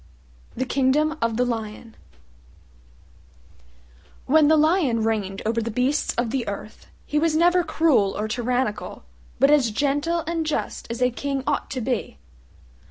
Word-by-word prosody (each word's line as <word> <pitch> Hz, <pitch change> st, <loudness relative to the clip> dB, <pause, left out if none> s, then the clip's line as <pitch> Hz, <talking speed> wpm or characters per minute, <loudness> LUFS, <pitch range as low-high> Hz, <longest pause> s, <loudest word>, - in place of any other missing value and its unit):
THE 260 Hz, -, -1 dB
KINGDOM 290 Hz, +4 st, +1 dB
OF 230 Hz, -1 st, 0 dB
THE 250 Hz, -, +2 dB
LION 225 Hz, -1 st, -5 dB, 2.3 s
When 300 Hz, +2 st, +4 dB
the 315 Hz, +1 st, +5 dB
Lion 305 Hz, -, +2 dB
reigned 205 Hz, -3 st, -2 dB
over 230 Hz, +1 st, 0 dB
the 230 Hz, -, -3 dB
beasts 250 Hz, +6 st, 0 dB
of 235 Hz, -1 st, -1 dB
the 260 Hz, -2 st, -2 dB
earth 205 Hz, +1 st, -7 dB, 0.2 s
he 300 Hz, -, 0 dB
was 320 Hz, 0 st, +1 dB
never 350 Hz, +2 st, +4 dB
cruel 315 Hz, -11 st, +2 dB
or 210 Hz, -, -2 dB
tyrannical, 245 Hz, 0 st, -2 dB, 0.4 s
but 275 Hz, +1 st, +5 dB
as 280 Hz, -6 st, +4 dB
gentle 290 Hz, +8 st, 0 dB
and 330 Hz, 0 st, -1 dB
just 310 Hz, -1 st, -3 dB
as 235 Hz, +2 st, -2 dB
a 250 Hz, -, +3 dB
King 275 Hz, +2 st, -3 dB
ought -, -, -1 dB
to 255 Hz, -, -4 dB
be. 245 Hz, 0 st, -3 dB
260 Hz, 150 wpm, -23 LUFS, 230-305 Hz, 2.3 s, the